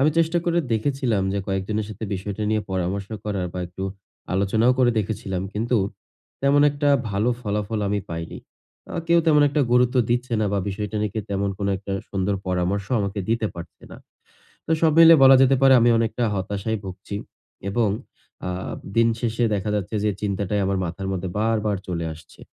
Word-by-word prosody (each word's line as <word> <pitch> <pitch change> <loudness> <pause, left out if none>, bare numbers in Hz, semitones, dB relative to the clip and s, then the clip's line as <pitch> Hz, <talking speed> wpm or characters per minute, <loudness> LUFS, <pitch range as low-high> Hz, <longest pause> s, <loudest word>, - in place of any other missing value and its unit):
আমি 150 +3 +4
চেষ্টা 165 +1 +2
করে 170 0 +1
দেখেছিলাম 120 -2 0
যে 100 - -1
কয়েকজনের 100 +2 -2
সাথে 110 +1 -6
বিষয়টা 100 +2 -4
নিয়ে 110 -1 +1
পরামর্শ 95 +2 -2 0.2
করার 100 -4 -2
বা, 90 - -5
একটু 90 +2 -8 0.5
আলোচনাও 110 +5 +3
করে 125 -1 +5
দেখেছিলাম 95 -3 -3
কিন্তু 115 +4 0 0.7
তেমন 140 +1 +4
একটা 145 0 0 0.2
ভালো 105 +5 +1
ফলাফল 105 -1 -2
আমি 105 0 0
পাইনি। 80 0 -5 0.6
আ - - -3
কেউ 170 0 +5
তেমন 150 -2 +5
একটা 145 +1 0
গুরুত্ব 125 +1 +3
দিচ্ছে 120 0 0
না 105 - +1
বা, 100 - +1
বিষয়টা 105 +1 -4
নিয়ে 105 -2 -1
কেউ 110 -3 -3
তেমন 100 0 0
কোনো 100 -1 0
একটা 100 0 -6 0.2
সুন্দর 100 +1 0
পরামর্শও 95 +5 -1
আমাকে 100 0 -3
দিতে 115 0 +1
পারছে 85 -1 -10
না। - - -9 0.7
তো - - -2
সব 160 -1 +5
মিলে 165 0 +10
বলা 135 0 +9
যেতে 135 0 +5
পারে 135 -1 +7
আমি 120 +1 +4
অনেকটা 115 +1 0
হতাশায় 100 +3 -2
ভুগছি 95 +2 -7 0.5
এবং 110 +1 +1 0.6
আ - - -1 0.5
দিন 115 0 +5
শেষে 120 0 -1
দেখা 100 +1 -2
যাচ্ছে 105 +1 -3
যে 105 - +2
চিন্তাটাই 100 0 -1
আমার 95 0 0
মাথার 90 +3 -5
মধ্যে 95 -1 -3
বারবার 110 -2 +1
চলে 85 -2 -2
আসছে। 80 0 -17
105 Hz, 180 wpm, -23 LUFS, 95-120 Hz, 0.7 s, মিলে